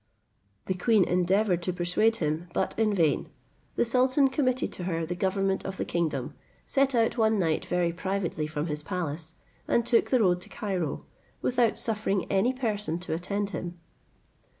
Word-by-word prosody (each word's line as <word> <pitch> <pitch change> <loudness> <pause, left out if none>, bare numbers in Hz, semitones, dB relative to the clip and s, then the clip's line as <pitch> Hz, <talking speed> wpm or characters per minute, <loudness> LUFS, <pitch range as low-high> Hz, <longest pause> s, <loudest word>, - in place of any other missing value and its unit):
The 185 - 0
queen 205 +2 +3
endeavoured 180 +1 +2
to 180 - -1
dissuade 180 +6 +2
him, 160 -2 -2
but - - 0
in 220 -1 +2
vain. 165 -7 +1 0.5
The - - +2
sultan 255 +3 +3
committed 260 -2 0
to 180 - -4
her 165 -2 -1
the 170 - -3
government 190 +1 0
of 195 0 -5
the - - -2
kingdom, 170 -2 -2 0.3
set 275 -1 +2
out 230 +1 +2
one 220 -1 +3
night 165 -5 0
very 175 -1 +1
privately 180 -4 -2
from 155 -1 -3
his 150 -2 -3
palace, 165 -2 -4 0.3
and 235 - +2
took 240 -1 +3
the 255 - +3
road 180 -3 +3
to - - -7
Cairo, 185 - -3 0.4
without 245 -3 +2
suffering 210 -4 0
any 200 +6 +3
person 210 -10 -2
to 175 -2 -4
attend 200 +4 -2
him. 175 -2 -5
190 Hz, 170 wpm, -28 LUFS, 170-225 Hz, 0.5 s, queen